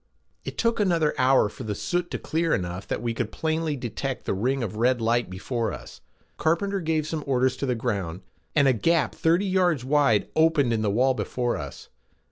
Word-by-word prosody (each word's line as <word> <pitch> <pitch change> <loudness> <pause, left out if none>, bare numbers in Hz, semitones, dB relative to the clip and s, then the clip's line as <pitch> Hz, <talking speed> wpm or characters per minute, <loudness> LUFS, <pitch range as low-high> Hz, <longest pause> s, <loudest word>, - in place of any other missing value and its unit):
It - - -7
took 230 -1 +1
another 170 -7 +2
hour 130 -3 +4
for - - -9
the 105 -1 -3
soot 175 - -2
to - - -3
clear 165 0 0
enough 90 +1 -4
that - - -3
we 120 -1 -1
could 115 -1 -3
plainly 160 -1 -1
detect 130 +1 -4
the - - 0
ring 125 +7 0
of 110 -2 -4
red 125 +2 +2
light 115 -1 +1
before 115 +5 -2
us. - - -10 0.4
Carpenter 195 +5 +1
gave 160 -2 0
some 155 -1 -3
orders 130 -1 +2
to 140 - -2
the 125 - +1
ground, 100 -7 -3 0.3
and 145 -3 +5
a 130 - +5
gap 165 +7 +1
thirty 170 +5 +2
yards 180 -8 +1
wide 135 -7 +3
opened 160 -6 +3
in 110 - 0
the 105 - +1
wall 125 +6 +3
before 125 -1 -2
us. 70 -1 -8
130 Hz, 200 wpm, -25 LUFS, 115-160 Hz, 0.4 s, and